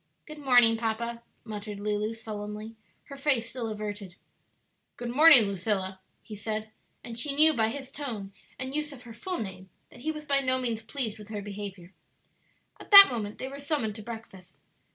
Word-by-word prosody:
"Good 305 -1 -10
morning, 245 -5 +5
papa," 230 +1 -3 0.2
muttered 210 -2 -7
Lulu, 210 +1 -1
sullenly, 215 0 -7 0.3
her 280 - -10
face 265 -5 +1
still 245 -2 -4
averted. 205 -3 -6 0.8
"Good 240 -1 -4
morning, 300 -2 +8
Lucilla," 195 -1 -2 0.2
he 215 - -9
said; 215 +1 -4 0.3
and 230 0 -4
she 280 +3 0
knew 310 +2 +6
by 225 -5 +2
his 270 +3 -6
tone 225 -9 -5 0.2
and 260 +1 -5
use 300 0 -2
of 255 -3 -12
her 235 -2 -11
full 355 - -4
name 190 -3 -7 0.2
that - - -14
he 315 +4 -1
was 305 -1 -8
by 280 -1 +2
no 260 -1 +1
means 235 -3 -2
pleased 225 -2 -4
with 210 0 -12
her 210 -2 -5
behavior. 200 -3 -8 0.9
At - - -12
that 400 -6 +11
moment 215 -3 -4
they 260 - -5
were 275 +1 -8
summoned 285 -7 -1
to - - -7
breakfast. 220 -5 -10
225 Hz, 180 wpm, -28 LUFS, 210-265 Hz, 0.9 s, that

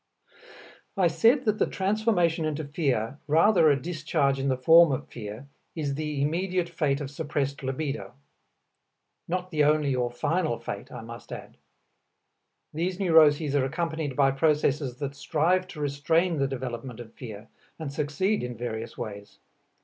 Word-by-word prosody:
I 190 - +3
said 230 - +3
that 215 -1 +1
the - - +3
transformation 190 -5 +1
into 155 0 -2
fear, 140 - -1
rather 165 +2 +5
a 140 -2 +3
discharge 155 -3 0
in 135 - -1
the 130 -1 +1
form 165 +4 +7
of 130 - -3
fear, 110 +3 -8 0.3
is 145 -4 -2
the 150 -1 -2
immediate 180 +3 0
fate 150 -4 0
of 140 -1 -5
suppressed 145 -2 -2
libido. 135 +2 -4 1.1
Not 180 +1 -3
the 150 -3 +2
only 150 -2 +3
or 125 -1 0
final 150 +1 -1
fate, 100 -3 -7
I - - -7
must 115 +1 -10
add. - - -8 1.2
These 175 +4 -2
neuroses 155 -5 +5
are 140 - +3
accompanied 160 -1 -3
by 135 -1 +4
processes 140 -2 +1
that 140 -2 -4
strive 170 +6 +1
to 180 -5 -10
restrain 155 +4 +1
the 135 - +2
development 125 -2 -5
of 115 -2 -10
fear, 110 -3 -9 0.3
and 155 -4 -5
succeed 155 +8 0
in 125 -2 -5
various 115 -1 -5
ways. 100 -3 -7
150 Hz, 150 wpm, -27 LUFS, 135-165 Hz, 1.2 s, form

